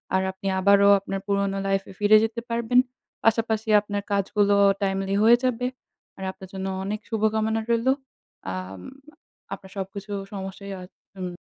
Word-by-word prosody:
আর 190 - +3
আপনি 190 +1 -7
আবারও 200 +1 +5
আপনার 195 0 -4
পুরোনো 200 -1 0
লাইফে 195 0 -1
ফিরে 210 +1 +6
যেতে 225 +1 -2
পারবেন। 235 +1 +2 0.4
পাশাপাশি 220 -1 +1
আপনার 205 0 -3
কাজগুলো 200 +1 +2 0.3
timely 195 0 0
হয়ে 235 +2 +7
যাবে। 250 -1 0 0.5
আর 190 - -7
আপনার 190 0 -12
জন্য 190 0 -4 0.2
অনেক 205 +2 -3
শুভকামনা 220 0 +1
রইলো। 235 +3 +3 0.6
আম 95 0 -6 0.7
আপনার 190 - -10
সবকিছু 195 +2 -6 0.2
সমস্যাই 195 0 -6
হয় 180 0 -10 0.3
উম 180 -1 -5
200 Hz, 140 wpm, -25 LUFS, 195-220 Hz, 0.7 s, হয়ে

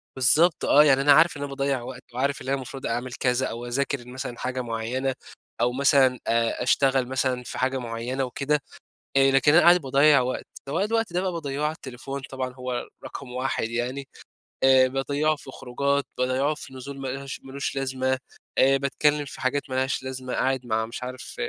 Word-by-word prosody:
بالضبط، 150 +6 +4
آه 150 - +7
يعني 135 -2 +4
أنا 145 +1 +6
عارف 160 +1 +5
إن 145 - -8
أنا 145 - -4
باضيّع 135 -2 -1
وقت 125 +1 -8
وعارف 140 +3 -1
إن - - -9
أنا 135 - +2
المفروض 135 0 -7
أعمل 120 +2 -2
كذا 125 0 0
أو 120 +1 -6
أذاكر 130 0 -2
مثلًا 125 -1 -6
حاجة 130 0 -2
معيّنة 120 +3 -2 0.5
أو 120 +1 +3
مثلًا 135 -2 +4
آآ، 115 +1 +1
أشتغل 130 0 +2
مثلًا 130 -1 -1
في - - -7
حاجة 130 +1 0
معيّنة 120 +3 -3
وكده، 140 +3 -1 0.6
آآ، 135 0 +5
لكن 140 +2 +4
أنا 175 - +7
قاعد 175 0 +6
باضيّع 140 +2 +5
وقت، 125 +1 -3 0.2
طب 140 - -5
أنا 195 +4 +2
الوقت 225 -4 -1
ده 180 - +1
بقى 185 -1 -1
باضيّعه 145 -3 -4
على 150 - +1
التليفون 135 -1 -7
طبعًا 130 -1 -4
هو 125 -1 -4 0.2
رقم 130 -3 -8
1 130 -2 -2
يعني. 125 +4 -3 0.6
آآ، 130 -1 +6
باضّيعه 140 +4 0
في 135 -2 -12
خروجات، 140 +3 -1
باضيّعه 130 +4 +1
في 135 - -10
نزول 135 +2 -8
ما 135 - -4
لهاش 135 +1 -5
ما 135 - -11
لوش 140 0 -3
لازمة 130 -1 -1 0.4
آآ، 135 +1 +5
باتكلِّم 145 +2 +1
في - - -10
حاجات 140 +2 -1
ما 130 - -3
لهاش 130 0 0
لازمة، 130 -1 -5
قاعد 130 -1 0
مع 110 -1 0
مش 115 +2 -7
عارف 130 0 -7
130 Hz, 200 wpm, -25 LUFS, 125-140 Hz, 0.6 s, آه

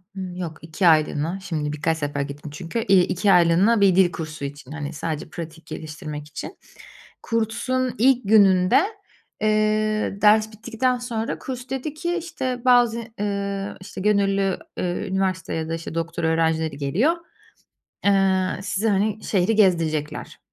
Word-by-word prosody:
hı, 190 - -5
yok, 180 -3 -5
2 160 +4 0
aylığına 155 +2 +2
şimdi 155 -5 -3
birkaç 160 +2 0
sefer 145 -2 -2
gittim 145 +1 -6
çünkü, 165 +8 -4
eee, 195 -4 +4
2 190 +3 +1
aylığına 180 +5 +4
bir 195 -3 +5
dil 185 -2 +5
kursu 155 -4 -6
için, 140 -1 -8
hani, 150 0 -5
sadece 155 0 -4
pratik 165 -1 -8
geliştirmek 150 -1 -7
için. 150 - -8 0.7
Kursun 245 +3 -1
ilk 245 -1 +3
gününde, 195 +1 +5 0.6
eee, 215 -1 +1
ders 215 +1 +5
bittikten 235 +3 -1
sonra 235 -2 -3
kurs 255 -1 -7
dedi 270 +3 -3
ki, 345 +3 -2
işte, 265 -8 -3
bazı, 240 -2 +4 0.2
eee, 200 -1 -2
işte, 185 - -8
gönüllü, 195 -2 +2 0.2
eee, 180 +3 -2
üniversite 190 -1 -1
ya 160 0 -3
da, - - -2
işte, 165 0 -7
doktora 165 0 -2
öğrencileri 160 -2 +1
geliyor, 180 - +2 0.9
eee, 190 -2 +2
size, 205 +3 -1
hani, 210 +2 0
şehiri 195 +2 +1
gezdirecekler. 165 -7 +1
190 Hz, 145 wpm, -23 LUFS, 160-215 Hz, 0.9 s, bir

